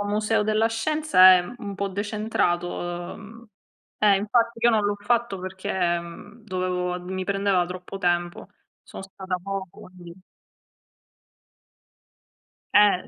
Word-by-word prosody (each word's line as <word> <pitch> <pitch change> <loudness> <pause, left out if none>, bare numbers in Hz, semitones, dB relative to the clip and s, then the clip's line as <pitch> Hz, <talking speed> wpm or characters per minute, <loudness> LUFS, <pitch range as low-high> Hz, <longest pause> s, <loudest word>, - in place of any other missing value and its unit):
un 205 - -3
museo 215 +1 +1
della 215 +1 +2
scienza 225 -5 +5
è - - +3 0.2
un 200 -4 -7
po' 200 - -2
decentrato, 175 -4 -2
ehm 230 +3 -13 0.5
eh, 205 -2 +5
infatti 230 +3 0
io 240 - +7
non 215 -2 +2
l'ho 205 0 0
fatto 235 -1 0
perché, 185 -2 -2
mhmm, 205 +7 -12
dovevo 180 -2 -2
mi 185 +1 -5
prendeva 195 -1 +1
troppo 180 +2 -8
tempo. 175 0 -1 0.3
Sono - - -10
stata 190 -1 -5
poco, 195 -1 -7
lì. 170 -1 -10 2.6
Eh, 205 -3 +5
195 Hz, 125 wpm, -24 LUFS, 180-215 Hz, 2.6 s, io